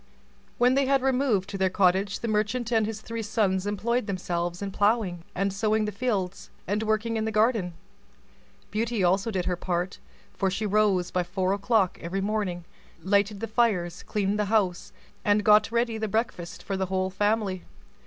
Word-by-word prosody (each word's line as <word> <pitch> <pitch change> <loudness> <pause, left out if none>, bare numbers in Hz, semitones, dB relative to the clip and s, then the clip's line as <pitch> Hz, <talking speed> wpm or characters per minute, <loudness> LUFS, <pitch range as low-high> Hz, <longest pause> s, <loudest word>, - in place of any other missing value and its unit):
When 245 +1 +4
they 275 0 +2
had 270 -1 +2
removed 255 -7 +1
to 195 - -5
their 190 0 +3
cottage, 190 +2 +2
the 235 - -2
merchant 220 +3 0
and 220 -2 +2
his 220 -1 -5
three 230 +1 -5
sons 205 -3 0
employed 225 +3 -1
themselves 175 -2 -2
in 200 -1 -4
ploughing 205 -4 +1
and 195 +1 0
sowing 215 +1 +1
the 210 - -2
fields, 200 -4 -2 0.2
and 205 +3 -1
working 220 +1 0
in 220 - -1
the 220 - -1
garden. 215 -5 +1 1.0
Beauty 225 -1 -1
also 190 +5 +2
did 185 -5 -2
her 180 - 0
part, 180 +1 -3 0.3
for 195 - 0
she 205 +3 -2
rose 200 -3 +2
by 180 - +1
four 185 +1 -1
o'clock 200 -2 +1
every 175 +3 -3
morning, 195 -4 -2 0.4
lighted 200 +1 +1
the 225 - -2
fires, 200 -7 +1
cleaned 205 0 -1
the 210 - +2
house, 195 -4 0 0.3
and 205 0 +3
got 210 +1 +5
ready 235 -1 0
the 220 - -1
breakfast 210 -5 -3
for 195 - -3
the 190 0 -1
whole 190 0 -1
family. 205 -2 0
205 Hz, 180 wpm, -26 LUFS, 185-220 Hz, 1.0 s, got